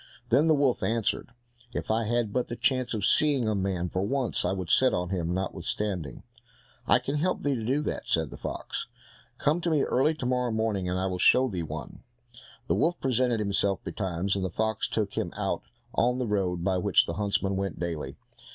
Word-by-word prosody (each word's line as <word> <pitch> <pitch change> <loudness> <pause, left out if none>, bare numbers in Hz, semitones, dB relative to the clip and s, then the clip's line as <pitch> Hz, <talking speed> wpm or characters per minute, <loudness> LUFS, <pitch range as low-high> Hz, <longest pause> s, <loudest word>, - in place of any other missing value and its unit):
Then 150 +3 +4
the 160 - +5
wolf 140 -4 +2
answered, 115 -1 0 0.5
"If - - -2
I 110 +1 +1
had 115 -2 0
but 125 - 0
the 120 - -4
chance 130 -2 0
of 100 -2 -1
seeing 140 -6 +3
a 110 - +2
man 95 -3 -1
for 95 +1 -2
once, 125 +4 0
I 90 - +1
would 95 -3 -3
set 130 0 +5
on 90 0 -2
him 85 -3 -1
notwithstanding." 95 - -3 0.6
"I - - +6
can 140 +2 -2
help 180 +5 0
thee 145 - +2
to 115 -4 -3
do 135 +6 +1
that," - - -4
said 80 -3 +1
the - - -8
fox. - - -5 0.5
"Come 155 +4 +1
to 170 - 0
me 155 -4 +3
early 145 +5 +2
to 140 - -5
morrow 125 -1 +1
morning, 110 -4 0
and 90 - 0
I 95 - 0
will 90 -1 -2
show 130 +7 +5
thee 95 -7 -3
one." 80 - -6 0.6
The - - +1
wolf 175 +1 +1
presented 125 -2 +1
himself 100 -1 0
betimes, 95 0 -2
and 95 - -1
the 95 - -1
fox 110 +4 -1
took 105 -3 -1
him - - -2
out - - -1 0.3
on 125 +2 +2
the 130 - -1
road 95 -5 0
by 95 -1 +1
which 100 0 +4
the 85 - -3
huntsmen 100 0 0
went 95 -5 -3
daily. 85 -3 -3
105 Hz, 210 wpm, -28 LUFS, 95-125 Hz, 0.6 s, I